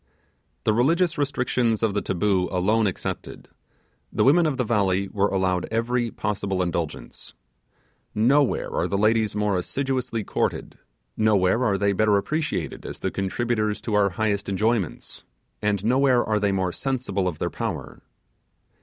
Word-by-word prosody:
The 110 Hz, -, +2 dB
religious 165 Hz, +9 st, +2 dB
restrictions 125 Hz, -5 st, 0 dB
of 110 Hz, -3 st, +2 dB
the -, -, 0 dB
taboo 95 Hz, -1 st, 0 dB
alone 105 Hz, +4 st, +2 dB
excepted, 95 Hz, -, -5 dB, 0.6 s
the -, -, +1 dB
women 160 Hz, +5 st, +5 dB
of 140 Hz, -4 st, -1 dB
the 125 Hz, -, +1 dB
valley 100 Hz, -4 st, +1 dB
were 100 Hz, -1 st, +1 dB
allowed 95 Hz, -2 st, 0 dB
every 120 Hz, +1 st, 0 dB
possible 100 Hz, -4 st, -2 dB
indulgence. 85 Hz, -8 st, -5 dB, 0.8 s
Nowhere 135 Hz, +6 st, +2 dB
are -, -, 0 dB
the 100 Hz, -, -1 dB
ladies 110 Hz, 0 st, +2 dB
more 105 Hz, -1 st, +1 dB
assiduously 130 Hz, +1 st, -2 dB
courted; -, -, -2 dB, 0.4 s
nowhere 110 Hz, +1 st, +2 dB
are 100 Hz, -5 st, +2 dB
they 100 Hz, 0 st, +1 dB
better 105 Hz, +1 st, +3 dB
appreciated 155 Hz, +9 st, -2 dB
as -, -, -7 dB
the -, -, -3 dB
contributors 105 Hz, +2 st, -1 dB
to 110 Hz, -, -4 dB
our 105 Hz, -1 st, +4 dB
highest 100 Hz, +1 st, -1 dB
enjoyments; 105 Hz, -1 st, -1 dB, 0.4 s
and 105 Hz, -1 st, 0 dB
nowhere 130 Hz, 0 st, +3 dB
are 105 Hz, -1 st, 0 dB
they 100 Hz, -1 st, +1 dB
more 95 Hz, -2 st, 0 dB
sensible 120 Hz, -6 st, -2 dB
of 85 Hz, -4 st, -3 dB
their -, -, -2 dB
power. -, -, -5 dB
105 Hz, 145 wpm, -24 LUFS, 100-120 Hz, 0.8 s, women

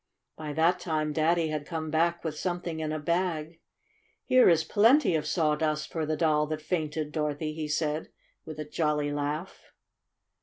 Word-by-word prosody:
By 155 Hz, -1 st, -6 dB
that 165 Hz, +4 st, +3 dB
time 155 Hz, -3 st, -1 dB
Daddy 160 Hz, +1 st, +2 dB
had 150 Hz, -2 st, -4 dB
come 160 Hz, -2 st, -4 dB
back 170 Hz, +2 st, +1 dB
with 160 Hz, -2 st, -3 dB
something 175 Hz, -1 st, -3 dB
in 155 Hz, -1 st, -2 dB
a 155 Hz, -, -1 dB
bag. 165 Hz, 0 st, -2 dB, 0.7 s
"Here 255 Hz, -4 st, +6 dB
is 165 Hz, -2 st, +4 dB
plenty 230 Hz, -, +4 dB
of 155 Hz, -2 st, 0 dB
sawdust 155 Hz, -2 st, 0 dB
for 160 Hz, -2 st, -2 dB
the 155 Hz, 0 st, -1 dB
doll 150 Hz, -1 st, +2 dB
that 155 Hz, 0 st, -3 dB
fainted, 155 Hz, -3 st, -2 dB
Dorothy," 150 Hz, 0 st, -2 dB
he 155 Hz, -1 st, -4 dB
said 150 Hz, +1 st, -1 dB, 0.3 s
with 155 Hz, -1 st, -8 dB
a 150 Hz, -, -4 dB
jolly 150 Hz, -1 st, 0 dB
laugh. 145 Hz, +5 st, -4 dB
155 Hz, 165 wpm, -28 LUFS, 150-170 Hz, 0.7 s, Here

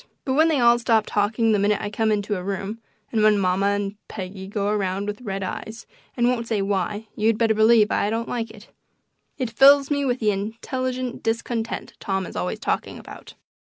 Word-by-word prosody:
But 260 Hz, -, 0 dB
when 315 Hz, +4 st, +4 dB
they 310 Hz, -4 st, +2 dB
all 240 Hz, 0 st, +5 dB
stop 225 Hz, -2 st, +2 dB
talking 220 Hz, +2 st, +1 dB
the 210 Hz, -, +3 dB
minute 205 Hz, +1 st, +2 dB
I 205 Hz, -, -4 dB
come 220 Hz, 0 st, +1 dB
into 205 Hz, 0 st, 0 dB
a 180 Hz, -, -4 dB
room, 195 Hz, +3 st, -4 dB, 0.3 s
and 220 Hz, -, +1 dB
when 215 Hz, -1 st, +5 dB
mamma 190 Hz, 0 st, +1 dB
and 200 Hz, 0 st, -1 dB
Peggy 190 Hz, -1 st, -7 dB
go 200 Hz, 0 st, -2 dB
around 200 Hz, -1 st, -1 dB
with 210 Hz, +3 st, -5 dB
red 195 Hz, -4 st, -4 dB
eyes 220 Hz, +4 st, -6 dB, 0.3 s
and 240 Hz, 0 st, +3 dB
won't 240 Hz, -2 st, 0 dB
say 220 Hz, -3 st, 0 dB
why, 205 Hz, +2 st, -2 dB
you'd 220 Hz, +1 st, +2 dB
better 225 Hz, -1 st, +3 dB
believe 220 Hz, 0 st, +5 dB
I 205 Hz, -, +1 dB
don't 230 Hz, +1 st, -2 dB
like 230 Hz, -2 st, -3 dB
it. 220 Hz, 0 st, -14 dB, 0.7 s
It 255 Hz, -5 st, -2 dB
fills 275 Hz, +4 st, +6 dB
me 285 Hz, -1 st, +1 dB
with 250 Hz, -2 st, 0 dB
the 215 Hz, -2 st, +2 dB
"intelligent 250 Hz, +5 st, -3 dB
discontent" 225 Hz, 0 st, -3 dB
Tom 190 Hz, -1 st, -2 dB
is -, -, -10 dB
always 180 Hz, +4 st, -2 dB
talking 210 Hz, -, -2 dB
about. -, -, -12 dB
215 Hz, 200 wpm, -23 LUFS, 200-235 Hz, 0.7 s, fills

